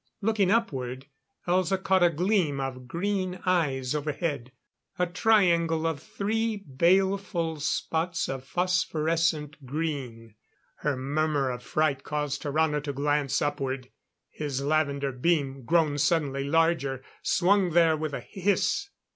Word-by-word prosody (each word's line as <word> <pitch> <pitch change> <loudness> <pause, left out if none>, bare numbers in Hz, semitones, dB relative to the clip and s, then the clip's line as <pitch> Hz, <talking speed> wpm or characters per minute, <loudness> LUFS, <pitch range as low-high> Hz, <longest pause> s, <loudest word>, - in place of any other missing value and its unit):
Looking 210 -3 +1
upward, 135 - -1 0.4
Elza 185 +2 +2
caught 190 0 +2
a 175 - +6
gleam 170 -3 +1
of 130 -2 -5
green 185 +4 -2
eyes 140 -8 +1
overhead. 150 -3 -2 0.5
A 180 - +2
triangle 170 -5 +2
of 165 -3 -1
three 220 +1 -1
baleful 175 +1 +1
spots 165 +3 -1
of 135 -1 -4
phosphorescent 165 -2 0
green. 130 -6 -4 0.4
Her 145 -3 -1
murmur 145 0 0
of 125 0 -6
fright 140 -1 0
caused 150 -1 -2
Tarrano 150 0 +1
to 145 -1 -4
glance 140 0 0
upward. 135 -3 -3 0.4
His 140 -3 -3
lavender, 140 -2 +1
beam, 135 -1 0
grown 155 -2 +2
suddenly 140 -3 +1
larger, 145 -4 +1 0.2
swung 190 +1 +3
there 165 -2 +5
with 155 -1 -4
a - - -5
hiss. 200 - 0
155 Hz, 120 wpm, -27 LUFS, 140-180 Hz, 0.5 s, a